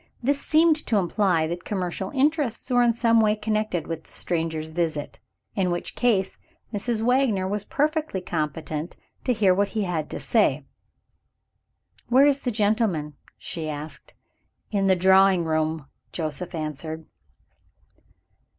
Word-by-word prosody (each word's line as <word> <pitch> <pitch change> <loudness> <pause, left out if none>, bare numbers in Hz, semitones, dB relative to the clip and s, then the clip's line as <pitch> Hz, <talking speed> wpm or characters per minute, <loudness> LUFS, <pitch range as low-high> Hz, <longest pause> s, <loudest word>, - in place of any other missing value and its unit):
This 280 +3 +1
seemed 315 0 +4
to 220 - +2
imply 180 -3 +2
that 175 +2 -4
commercial 190 -1 -3
interests 280 -3 0
were 245 0 +4
in 240 -1 +4
some 230 -1 +3
way 215 -1 +3
connected 215 -5 -1
with 165 -1 -5
the - - -18
stranger's 160 -2 -3
visit 155 -5 -2 0.3
in 190 -3 0
which 175 0 -3
case, 200 -6 +1 0.3
Mrs. 220 +2 -1
Wagner 240 -6 +2
was 205 +1 -2
perfectly 310 -7 0
competent 155 -1 -4 0.3
to 255 - +2
hear 205 -6 +4
what 200 +2 +2
he 215 - +1
had 165 -5 -2
to - - -5
say. - - +2 1.4
"Where 260 +3 +6
is 280 -1 +3
the 250 - -1
gentleman?" 205 -8 0 0.2
she 160 -2 -5
asked. 150 +1 -8 0.6
"In 200 -2 +1
the 190 - +5
drawing 190 0 +5
room," 155 -1 -1 0.3
Joseph 165 +2 -4
answered. 155 +1 -5
190 Hz, 140 wpm, -25 LUFS, 160-230 Hz, 1.4 s, Where